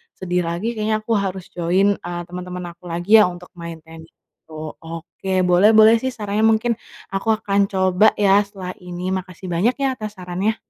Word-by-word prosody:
sedih 180 -1 -1
lagi, 180 +8 -2
kayaknya 215 -1 -1
aku 230 - -5
harus 190 -2 -4
join, 185 +4 +1
eee, 175 0 -5
teman-teman 180 0 -7
aku 175 +1 -15
lagi 175 +6 +4
ya, 210 - +6
untuk 180 0 -9
main 165 -1 -8
tenis 160 0 -13
itu. 155 -1 -11
Oke, 165 +3 -3
boleh 180 +5 +5
boleh 220 +1 +7
sih 260 0 -3
sarannya, 215 0 +1
mungkin 225 +1 +1 0.3
aku 195 +2 -3
akan 200 -2 +1
coba 190 +2 +3
ya, 200 -1 +4
setelah 185 -3 -7
ini. 180 +1 -5
Makasih 185 -1 -5
banyak 200 +9 +2
ya, 275 -1 0
atas 215 -1 -6
sarannya. 185 +4 -2
185 Hz, 180 wpm, -21 LUFS, 175-215 Hz, 0.3 s, boleh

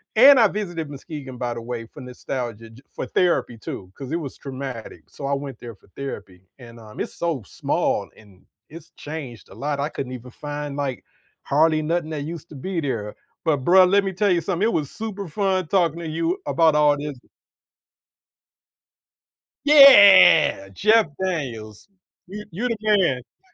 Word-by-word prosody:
And 265 +3 +8
I 220 - +6
visited 175 -7 -5
Muskegon, 140 -2 -9
by 120 -1 -3
the 115 - -7
way, 115 -1 -6
for - - -14
nostalgia, 125 -3 -6
j 125 +4 -16
for - - -5
therapy, 170 -9 0
too, 95 -3 -8
'cause 135 0 -8
it 165 - 0
was 140 -5 -7
traumatic, 130 -4 -8
so 140 - -9
I 140 - 0
went 140 -3 -7
there 115 -3 -9
for - - -27
therapy, 100 -9 -8 0.2
and, 115 -1 -13
um, 110 -1 -13
it's - - -5
so 165 -9 -2
small, - - -2
and 100 -4 -20 0.3
it's 165 +1 -12
changed 140 -8 -8
a 95 - -14
lot, 140 +3 -3
I 145 +2 -1
couldn't 130 -5 -6
even 125 0 -9
find, 145 0 -6
like, 140 -4 -4 0.4
hardly 155 +2 +2
nothing 165 0 -1
that 145 -2 -4
used 165 +1 -8
to 150 - -12
be 170 +5 -4
there. 110 -7 -4 0.3
But 155 -3 +2
bro, 185 +1 +7
let 200 +2 +3
me 190 -1 -3
tell 200 +1 +1
you 170 -1 +2
something, 190 +4 -1
it - - 0
was 145 -3 -2
super 205 -4 -6
fun 185 0 -1
talking 170 -4 +1
to 165 - -6
you 165 +3 -1
about 155 +2 +3
all 150 -1 +4
this 145 -2 -6 2.5
Yeah! 200 - +7
Jeff 215 - +3 0.2
Daniels. 120 - -5 0.4
You 210 +3 -8
you 225 +9 -3
the 230 -2 -2
man. 200 - -1
150 Hz, 175 wpm, -22 LUFS, 125-180 Hz, 2.5 s, And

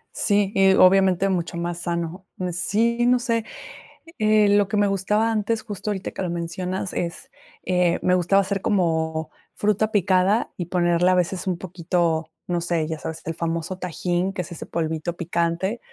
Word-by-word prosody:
Sí, 205 -2 +2
y 195 0 +5
obviamente 190 0 +5
mucho 175 -2 -2
más 170 0 -3
sano. 170 +2 -4 0.2
Sí, 230 +7 +1
no 250 0 +5
sé. 230 -2 -1 0.7
Eh, 215 -1 +4
lo 205 -1 +4
que 210 - -3
me 205 0 +3
gustaba 210 +3 +1
antes, 220 +1 -1
justo 210 0 -5
ahorita 195 -1 -4
que - - -6
lo 180 - -2
mencionas 180 +2 -3
es, 170 -1 -5 0.3
eh, 180 -1 +1
me 180 0 +3
gustaba 190 +3 +3
hacer 195 0 -2
como 160 -5 0 0.2
fruta 210 +1 0
picada 190 +2 +2
y 175 - -3
ponerle 175 0 +2
a 185 - +4
veces 180 +1 -1
un 180 -2 0
poquito, 170 -2 -1 0.2
no 175 -1 0
sé, 170 -2 -1
ya 160 -1 -4
sabes, 160 - -6
el 165 - -2
famoso 170 +2 -3
tajín, 180 +1 -2
que 180 - -2
es 175 - -9
ese 165 - -7
polvito 160 +1 -3
picante, 170 +5 -1
185 Hz, 175 wpm, -23 LUFS, 170-200 Hz, 0.7 s, y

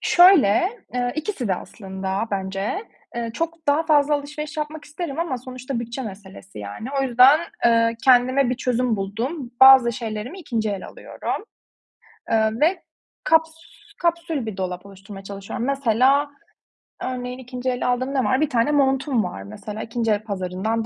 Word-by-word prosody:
Şöyle, 350 - +6 0.3
eee, 245 0 0
2'si 310 - -3
de 190 - +2
aslında 190 +2 -5
bence. 195 - -3 0.3
Eee, 235 -1 -2
çok 330 +1 -4
daha 290 +3 +3
fazla 295 -2 +3
alışveriş 300 +2 -5
yapmak 300 0 -4
isterim 300 -1 -6
ama 330 -7 -1
sonuçta 255 0 -5
bütçe 235 +3 -5
meselesi, 190 - -10
yani. 105 - -7
O - - +1
yüzden, 260 +4 +6 0.2
eee, 230 0 +4
kendime 255 0 +4
bir 255 - +1
çözüm 250 -3 0
buldum. 235 - -4
Bazı 265 -3 +8
şeylerimi 225 - -5
2'nci 225 -8 -2
el 195 -2 -5
alıyorum, - - -5 0.9
eee, 220 -1 +3
ve 340 +3 +2 0.4
kaps 320 0 +3 0.5
kapsül 335 -6 -1
bir 210 -3 -6
dolap 180 0 -4
oluşturmaya 195 0 -11
çalışıyorum. 200 +4 -5
Mesela, 275 +2 +2 0.7
örneğin 250 0 -4
2'nci 250 0 -4
el 250 0 -1
aldığım 255 +2 0
ne 265 -2 +1
var? 260 +2 +1
Bir 310 - +2
tane 240 +4 +2
montum 270 -4 +2
var, 95 - -6
mesela. 205 - -7
2'nci 230 -1 -1
el 210 0 0
pazarından 200 +3 -2
245 Hz, 155 wpm, -22 LUFS, 215-285 Hz, 0.9 s, Bazı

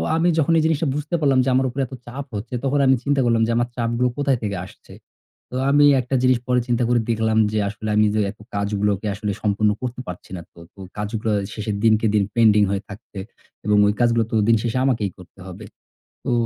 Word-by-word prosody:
আমি 165 +2 +2
যখন 160 +1 +2
এই - - +1
জিনিসটা 160 -1 +1
বুঝতে 150 +3 -3
পারলাম 140 -4 +3
যে - - +1
আমার 130 +1 +2
উপরে 135 +3 -3
এত 130 - -12
চাপ 135 +3 -6
হচ্ছে 115 +4 -6
তখন 140 +1 +1
আমি 130 - +5
চিন্তা 140 -1 +1
করলাম 115 -1 +2
যে, - - 0
"আমার 120 +1 +1
চাপগুলো 120 +1 0
কোথায় 140 -3 +1
থেকে 100 -1 -2
আসছে?" - - -16 0.6
তো - - -6 0.2
আমি 145 +1 +5 0.2
একটা 125 +2 -3
জিনিস 130 -1 +4
পরে 125 0 +2
চিন্তা 120 0 +1
করে 120 -1 +3
দেখলাম 110 -1 +1
যে 110 - 0
আসলে 110 +1 -6
আমি 105 0 +4
যে - - +1
এত 110 - -21 0.2
কাজগুলোকে 100 0 -1
আসলে 105 0 -3
সম্পূর্ণ 105 0 +1
করতে 125 0 -5
পারছি 90 +1 -9
না - - -7
তো, - - -18
তো - - -21 0.2
কাজগুলো 105 +1 -2 0.2
শেষের 105 -1 -4
দিনকে 110 0 +3
দিন 105 -1 +3
পেন্ডিং 110 -3 +5
হয়ে 100 0 -2
থাকবে 100 -1 -10 0.5
এবং 105 0 +3
ওই 105 - +2
কাজগুলোতো 115 -2 +1
দিন 115 - +5
শেষে 120 +1 -1
আমাকেই 110 -7 0
করতে 90 +1 -16
হবে। 95 +4 -9 0.6
তো - - -2
115 Hz, 215 wpm, -21 LUFS, 105-130 Hz, 0.6 s, আমি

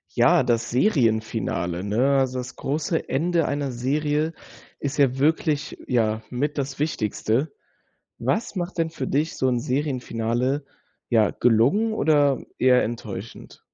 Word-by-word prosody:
Ja, - - +5
das 120 0 0
Serienfinale, 110 - 0
ne? 125 +8 +2
Also, 130 -1 0
das 125 +1 -6
große 155 +4 -2
Ende 165 +3 +1
einer 140 -2 -2
Serie 150 +5 0 0.4
ist 145 +1 -4
ja 135 -3 +3
wirklich, 155 0 0
ja, 110 -3 +1
mit 145 +4 -2
das 135 -1 -3
Wichtigste. 135 -1 -1 0.7
Was 140 - -1
macht 180 +1 -4
denn 165 -1 +1
für 140 -5 -5
dich 150 +4 -1
so 130 - +1
'n 125 -2 +1
Serienfinale, 130 0 -1 0.4
ja, 110 -4 +3
gelungen 130 - +3
oder 145 -8 +2
eher 125 -1 +4
enttäuschend? 110 -2 -7
135 Hz, 130 wpm, -24 LUFS, 120-150 Hz, 0.7 s, Ja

